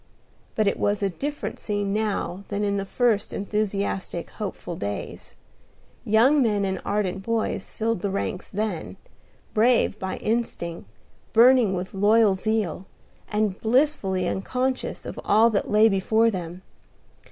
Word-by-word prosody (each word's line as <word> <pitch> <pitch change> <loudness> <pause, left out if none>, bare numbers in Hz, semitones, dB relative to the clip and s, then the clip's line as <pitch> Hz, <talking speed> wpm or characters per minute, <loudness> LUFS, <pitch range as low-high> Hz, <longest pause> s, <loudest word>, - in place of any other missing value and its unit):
But 215 -2 +2
it 200 - 0
was 205 0 0
a 195 - +1
different 290 - -5
scene 205 -2 -2
now 205 -3 -2
than 205 0 -2
in 200 -1 0
the 195 - -2
first 220 -1 +1
enthusiastic, 200 -4 -2
hopeful 200 -4 -6
days. 100 -6 -6 0.7
Young 245 +8 +4
men 210 -5 +2
and 190 0 -2
ardent 195 -2 -1
boys 220 -2 -2
filled 225 -3 -2
the 200 - -1
ranks 195 -1 -3
then, 205 -5 -3 0.6
brave 225 -2 +3
by 190 0 -3
instinct, 170 - -3 0.4
burning 235 -3 +6
with 180 +1 -5
loyal 205 +1 +4
zeal, 195 -3 -1 0.4
and 210 -2 -1
blissfully 225 -7 +1
unconscious 255 +8 -2
of - - -6
all 225 +3 +4
that 200 - -1
lay 215 +1 +6
before 220 +3 +2
them. 180 -1 -6
205 Hz, 135 wpm, -25 LUFS, 190-225 Hz, 0.7 s, burning